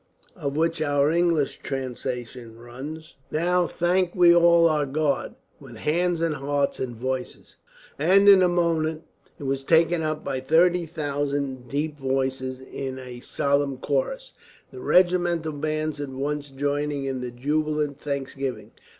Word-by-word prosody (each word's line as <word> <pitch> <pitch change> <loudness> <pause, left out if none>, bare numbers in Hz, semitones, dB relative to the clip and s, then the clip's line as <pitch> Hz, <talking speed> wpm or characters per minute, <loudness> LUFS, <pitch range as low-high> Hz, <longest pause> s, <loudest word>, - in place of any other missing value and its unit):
Of 145 -5 -4
which 165 0 +1
our 145 -1 +2
English 170 -4 +1
translation 125 -3 -5
runs: 140 +7 -9 0.2
Now 175 +2 +1
thank 175 +1 0
we 175 -2 +6
all 170 0 +6
our 150 -3 +1
God, 145 0 -1 0.2
With - - -12
hands 170 +2 0
and 165 -2 +1
hearts 140 -1 -1
and 125 -2 -4
voices. 130 +2 -5 0.4
And 190 +6 +5
in 195 -2 +9
a 180 - +4
moment 165 -2 0 0.3
it - - -10
was 135 0 -2
taken 165 +2 +3
up 155 -1 -2
by 135 -2 -2
30,000 145 -4 0
deep 150 +2 -2
voices, 130 -1 -2
in 130 0 -6
a 125 -2 -8
solemn 140 +1 0
chorus, - - -2 0.4
the - - -10
regimental 175 - +2
bands 155 0 -2
at 145 -1 -4
once 145 +2 -3
joining 145 +1 -2
in 135 -1 -3
the 125 - -4
jubilant 150 +3 -1
thanksgiving. 135 -6 -4
145 Hz, 140 wpm, -25 LUFS, 135-165 Hz, 0.4 s, in